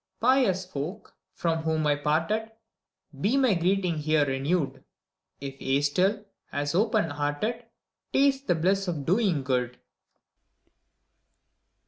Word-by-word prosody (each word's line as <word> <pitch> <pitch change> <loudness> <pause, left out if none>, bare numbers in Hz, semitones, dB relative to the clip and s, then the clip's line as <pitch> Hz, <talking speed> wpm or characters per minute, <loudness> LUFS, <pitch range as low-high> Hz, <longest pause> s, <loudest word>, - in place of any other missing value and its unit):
Pious 235 -7 +3
folk, 180 +4 -6 0.2
from 165 -1 -1
whom 160 -1 0
I 145 -1 +3
parted! 165 +10 -1 0.7
Be 230 - +2
my 260 -6 +4
greeting 180 -1 +1
here 155 -1 +2
renewed. 140 +3 -1 0.6
If 135 -1 -8
ye 135 +1 +1
still, 190 +8 +1 0.3
as 145 +1 -2
open 210 -3 +2
hearted, 150 +12 -2 0.5
Taste 275 0 +2
the 175 - +3
bliss 190 +4 +1
of 155 -6 -3
doing 185 - +2
good! 125 -2 -1
170 Hz, 115 wpm, -27 LUFS, 145-210 Hz, 0.7 s, my